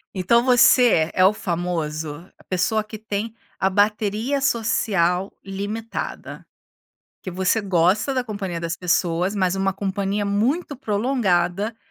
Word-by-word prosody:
Então, 215 +6 +3
você 245 -8 +5
é 185 - +3
o 190 +3 +6
famoso 165 -5 -3
a - - -21
pessoa 195 +4 0
que 215 +1 -9
tem 215 +1 -4 0.2
a 190 - +2
bateria 210 +6 0
social 195 -7 +1
limitada. 205 +4 -5 0.8
Que - - -6
você 185 +4 +1
gosta 195 +5 +1
da 255 -1 0
companhia 200 -6 -4
das 170 0 -4
pessoas, 180 +2 0
mas 185 -2 +1
uma 195 0 0
companhia 195 +1 -2
muito 255 - 0
prolongada, 205 -4 0
200 Hz, 125 wpm, -22 LUFS, 180-220 Hz, 0.8 s, o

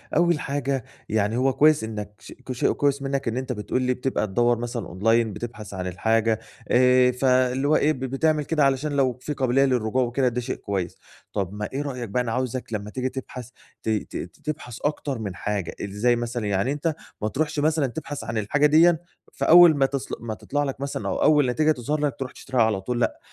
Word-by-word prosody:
أول 170 -2 +3
حاجة 140 -3 -2 0.3
يعني 110 +2 +1
هو 130 +1 +2
كويس 155 -4 +4
إنك 105 -2 -5
ش - - -11
كشيء 130 -2 0
كويس 140 -1 +1
منك 135 -1 -2
إن 115 +2 -1
أنت 130 0 -3
بتقول 125 +2 -2
لي 125 0 +1
بتبقى 125 -3 -1
تدّور 120 +4 +2
مثلًا 120 0 -4
أونلاين 115 +4 +1
بتبحث 110 -3 -7
عن 90 -1 -4
الحاجة 110 +4 +1 0.3
آآ، 125 0 +5
فاللي 130 +1 +2
هو 155 - +4
إيه 155 - +3
ب 130 - -9
بتعمل 150 +3 0
كده 155 -1 +1
علشان 135 +2 +1
لو 135 -3 +1
في 150 - -3
قابلية 135 0 +2
للرجوع 125 -1 +1
وكده 125 +2 0
ده 125 0 -1
شيء 125 +2 -3
كويس، 95 -4 -4 0.4
طب 95 -1 -2
ما 105 0 -4
إيه 140 - -1
رأيك 125 -5 -4
بقى 125 +5 +1
أنا 115 - -3
عاوزك 125 -1 -3
لمّا 105 -1 -3
تيجي 130 +3 -2
تبحث، 125 -1 -7 0.3
ت - - -2
ت 110 -1 -2 0.3
تبحث 150 -6 -5
أكتر 145 -3 -2
من 100 -5 -5
حاجة، 100 -3 -3
إزاي 105 +5 +1
مثلًا؟ 120 -1 -3
يعني 100 +6 +1
أنت 150 +2 -1 0.3
ما 105 - 0
تروحش 150 +6 -1
مثلًا 155 -1 +2
تبحث 145 +2 -6
عن 110 - -4
الحاجة 140 +8 +2
ديًّا 160 +3 +6 0.4
فأول 175 0 +7
ما 135 - +4
تصل 135 0 -3
ما 115 -1 -5
تطلع 145 +6 -2
لك 135 -1 -4
مثلًا 140 - -3
أو - - -1
أول 145 -4 +4
نتيجة 155 +5 +2
تظهر 150 +2 -1
لك 145 -4 0
ترُوح 130 -1 -4
تشتريها 130 -2 -2
على 105 -3 0
طول، 120 +5 -2
لأ، - - 0
125 Hz, 210 wpm, -24 LUFS, 115-140 Hz, 0.4 s, فأول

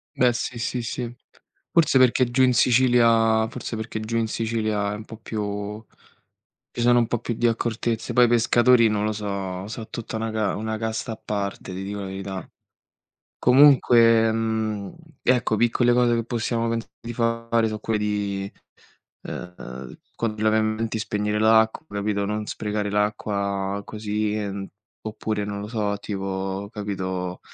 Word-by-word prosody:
Beh, 125 -1 +4
sì, 120 +1 -4
sì, 120 +1 -2
sì. 120 +1 -4 0.6
Forse 160 -5 +4
perché 130 0 +5
giù 130 +2 +3
in 125 -1 +4
Sicilia 115 -2 +4
forse 120 -2 -6
perché 110 0 -4
giù 115 +1 -2
in 115 -1 +1
Sicilia 110 -2 -1
è - - -3
un 110 +1 -8
po' 115 - -10
più 105 -1 -4 0.9
ci 120 - -4
sono 120 0 +5
un 115 - +3
po' 120 - -1
più 120 -1 -3
di 120 - -1
accortezze. 115 0 -1
Poi 125 0 +6
i - - +3
pescatori, 120 0 +5
non 105 0 0
lo 110 - 0
so, 100 -2 -4
so 110 0 -7
tutta 115 -1 -6
una 110 0 -2
ca 110 -2 0
una 110 +1 -3
casta 110 0 -3
a 110 - -8
parte, 100 -2 -4
ti 95 +1 -5
dico 100 +1 -5
la 100 - -4
verità. 95 -1 -6 0.9
Comunque, 120 -4 +6
mhmm, 110 -2 -2 0.3
ecco, 125 -3 +2
piccole 120 +2 +3
cose 120 -1 +3
che 115 - 0
possiamo 115 -1 -1
pensare 115 -1 -3
di 120 0 -6
fare 115 0 +1
so' 110 -1 -4
quelle 110 -1 -1
di, 100 -2 -2 0.7
eh, 65 -8 -8 0.2
quando 110 -2 -3
laviamo 110 0 +3
i - - -7
denti 110 0 -2
spegnere 105 0 -1
l'acqua, 110 +5 +4
capito, 100 0 -1
non 105 +1 -2
sprecare 105 -1 -3
l'acqua 100 -1 -1
così. 105 0 -2
Ehm, 100 -2 -3 0.4
oppure 110 -1 -3
non 100 0 -4
lo 105 - -6
so, 105 -3 -1
tipo, 95 0 -4
capito, 95 -4 -4
110 Hz, 165 wpm, -24 LUFS, 105-115 Hz, 0.9 s, Poi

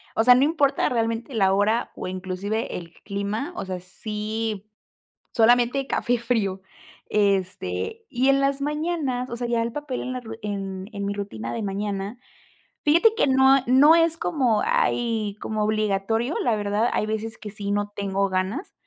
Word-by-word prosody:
o 225 - +3
sea, 250 - +8
no 250 +2 +4
importa 295 -3 +2
realmente 230 +2 -2
la 195 -2 +3
hora, 210 +4 +1
o - - -5
inclusive 190 +4 -3
el 170 -1 -10
clima. 210 - -3
O - - -4
sea, 185 -1 -4
sí, 215 +2 -4 0.7
solamente 245 +3 +4
café 245 -2 0
frío, 215 -6 -1 0.5
este, 195 - -1
y 260 +2 +2
en 275 0 +4
las 275 0 +1
mañanas, 295 -4 -1
o 235 - -4
sea, 240 0 -3
ya 235 -1 +1
el 230 - -4
papel 295 -2 -4
en 255 - -4
la 255 - -4
ru 225 -1 -8
en 195 -2 -4
en 200 -1 -4
mi 200 - -1
rutina 120 - -5
de - - -3
mañana 200 +2 -3 0.7
fíjate 335 +9 +5
que - - +2
no, 265 0 +5
ah, 270 - +1
no 270 +6 +7
es 330 -1 +3
como 255 -11 +1
ay, 220 -4 0
como 215 -1 -2
obligatorio, 215 +4 0
la 230 - +2
verdad. 205 +3 0
Hay - - +1
veces 220 +1 -3
que 210 - -8
sí 200 -1 -5
no 205 0 -1
tengo 195 -1 -1
ganas, 190 - -2
220 Hz, 175 wpm, -24 LUFS, 200-255 Hz, 0.7 s, sea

